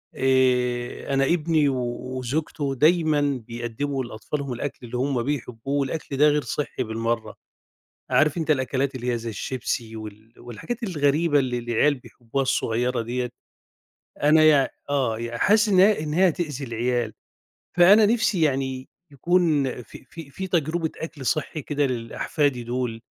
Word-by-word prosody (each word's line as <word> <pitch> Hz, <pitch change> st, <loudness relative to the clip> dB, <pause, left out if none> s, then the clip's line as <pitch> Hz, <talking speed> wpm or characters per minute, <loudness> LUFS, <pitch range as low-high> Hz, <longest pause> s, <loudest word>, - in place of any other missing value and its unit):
آآ 125 Hz, -1 st, +1 dB
أنا 135 Hz, 0 st, +3 dB
إبني 155 Hz, -2 st, +2 dB
وزوجته 130 Hz, +3 st, -3 dB
دايمًا 155 Hz, +1 st, +3 dB, 0.3 s
بيقدموا 120 Hz, +4 st, -3 dB
لأطفالهم 130 Hz, +4 st, -5 dB
الأكل 120 Hz, +2 st, -4 dB
اللي 120 Hz, +1 st, -5 dB
هُم 130 Hz, -2 st, 0 dB
بيحبوه، 135 Hz, 0 st, -3 dB
والأكل 140 Hz, 0 st, -3 dB
ده 150 Hz, +2 st, +6 dB
غير 150 Hz, 0 st, +2 dB
صحّي 140 Hz, -3 st, -3 dB
بالمرّة. 115 Hz, +1 st, -3 dB, 0.8 s
عارف 155 Hz, +2 st, +3 dB
أنت 160 Hz, -1 st, -2 dB
الأكلات 135 Hz, -1 st, 0 dB
اللي 125 Hz, -1 st, -2 dB
هي 120 Hz, -, -1 dB
زي 115 Hz, 0 st, -5 dB
الشيبسي 115 Hz, 0 st, -4 dB
وال 110 Hz, +1 st, -10 dB
والحاجات 120 Hz, -, -6 dB
الغريبة 150 Hz, -4 st, +2 dB
اللي 125 Hz, -3 st, 0 dB
العيال 120 Hz, +5 st, +2 dB
بيحبوها 125 Hz, 0 st, -5 dB
الصغيّرة 125 Hz, -2 st, 0 dB
ديّة، 125 Hz, +1 st, -3 dB, 0.9 s
أنا 155 Hz, +2 st, +6 dB
يع 150 Hz, -3 st, +5 dB, 0.2 s
آه 130 Hz, -6 st, 0 dB
يع 120 Hz, 0 st, -4 dB
حاسس 210 Hz, -, +4 dB
إن 185 Hz, -2 st, +4 dB
هي 205 Hz, 0 st, +5 dB
إن 150 Hz, -1 st, -3 dB
هي 185 Hz, +4 st, +5 dB
هتؤذي 150 Hz, -5 st, -4 dB
العيال. 120 Hz, -1 st, -1 dB, 0.6 s
فأنا 200 Hz, +5 st, +7 dB
نفْسي 220 Hz, -4 st, +1 dB
يعني 130 Hz, -3 st, 0 dB, 0.2 s
يكون 165 Hz, 0 st, +2 dB, 0.2 s
في -, -, -14 dB
في 165 Hz, -4 st, -11 dB
في 190 Hz, +7 st, -5 dB
تجربة 165 Hz, -2 st, 0 dB
أكل 155 Hz, -5 st, -7 dB
صحّي 155 Hz, +2 st, -1 dB
كده 145 Hz, 0 st, 0 dB
للأحفادي 125 Hz, +2 st, -1 dB
دول، 120 Hz, -1 st, -3 dB
135 Hz, 145 wpm, -24 LUFS, 120-155 Hz, 0.9 s, فأنا